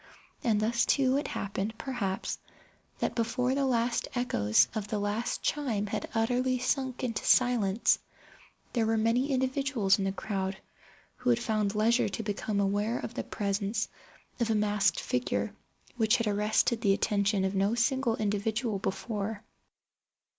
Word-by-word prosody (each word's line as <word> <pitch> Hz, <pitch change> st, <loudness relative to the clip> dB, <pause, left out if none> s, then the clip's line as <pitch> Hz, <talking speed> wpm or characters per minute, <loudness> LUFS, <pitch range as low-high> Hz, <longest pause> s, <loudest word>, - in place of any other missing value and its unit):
And 220 Hz, -5 st, +2 dB
thus 230 Hz, +2 st, +2 dB
too, 265 Hz, 0 st, +3 dB
it 290 Hz, -, -2 dB
happened, 200 Hz, +2 st, -3 dB
perhaps, 210 Hz, -8 st, -3 dB, 0.6 s
that -, -, -1 dB
before 235 Hz, +2 st, 0 dB
the 275 Hz, 0 st, +1 dB
last 235 Hz, -1 st, +1 dB
echoes 110 Hz, -, +3 dB
of 215 Hz, -2 st, -3 dB
the 210 Hz, -, -2 dB
last 205 Hz, +3 st, -2 dB
chime 245 Hz, -9 st, 0 dB
had 205 Hz, -, -4 dB
utterly 250 Hz, +3 st, +1 dB
sunk 255 Hz, 0 st, -1 dB
into 230 Hz, -3 st, -2 dB
silence, 235 Hz, -4 st, +3 dB, 0.7 s
there 230 Hz, -3 st, +1 dB
were 225 Hz, 0 st, +2 dB
many 230 Hz, +5 st, +2 dB
individuals 260 Hz, -6 st, +1 dB
in 195 Hz, -, 0 dB
the 195 Hz, -, 0 dB
crowd 190 Hz, 0 st, -3 dB, 0.6 s
who 250 Hz, -, -1 dB
had 240 Hz, -, +4 dB
found 215 Hz, -3 st, 0 dB
leisure 230 Hz, +3 st, +3 dB
to 225 Hz, -, -4 dB
become 205 Hz, 0 st, -2 dB
aware 205 Hz, +4 st, +1 dB
of 235 Hz, -, -5 dB
the -, -, -3 dB
presence 205 Hz, +1 st, -2 dB, 0.5 s
of 235 Hz, -2 st, +1 dB
a 220 Hz, -, +2 dB
masked 205 Hz, -4 st, +2 dB
figure 105 Hz, -5 st, -1 dB, 0.4 s
which 220 Hz, -2 st, +3 dB
had 230 Hz, -, -1 dB
arrested 210 Hz, +2 st, +1 dB
the 200 Hz, -4 st, +4 dB
attention 200 Hz, -1 st, +1 dB
of 190 Hz, -, -1 dB
no 200 Hz, +3 st, +1 dB
single 240 Hz, 0 st, +1 dB
individual 215 Hz, +1 st, -1 dB
before. 210 Hz, +1 st, -3 dB
220 Hz, 150 wpm, -29 LUFS, 200-245 Hz, 0.7 s, had